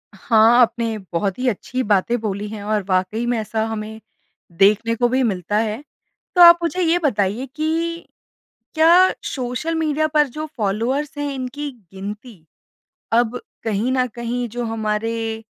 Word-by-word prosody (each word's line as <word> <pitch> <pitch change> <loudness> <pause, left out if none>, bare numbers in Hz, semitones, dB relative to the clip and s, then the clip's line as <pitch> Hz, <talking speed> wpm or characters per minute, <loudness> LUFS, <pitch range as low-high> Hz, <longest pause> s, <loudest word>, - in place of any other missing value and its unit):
हाँ। 225 +3 +4
आपने 230 -1 +1 0.2
बहुत 190 +3 -1
ही 255 - -1
अच्छी 250 +4 -3
बातें 210 +3 +1
बोली 210 -1 -3
हैं। 210 -1 -7
और 210 0 -1
वाक़ई 185 +5 0
में 240 0 0
ऐसा 220 +1 -2
हमें 220 0 -5 0.6
देखने 215 +3 +4
को 240 +1 +2
भी 260 +2 +1
मिलता 200 -3 -1
है। 220 +4 -1 0.5
तो 355 - +5
आप 340 0 +10
मुझे 360 +2 -1
ये 340 +1 +2
बताइए 225 - 0
कि 330 +2 -2 0.7
क्या 340 +4 +6 0.2
सोशल 255 +5 -3
मीडिया 310 -1 0
पर 300 -1 +3
जो 305 +5 -6
फ़ॉलोअर्स 235 +8 -1
है 290 -1 -2
इनकी 270 +3 -5 0.2
गिनती 200 -1 -9 0.7
अब 240 +1 +2 0.2
कहीं 225 +3 -1
न 255 -1 +2
कहीं 240 +1 -3
जो 240 +2 -4
हमारे 225 0 -2
235 Hz, 150 wpm, -20 LUFS, 215-280 Hz, 0.7 s, आप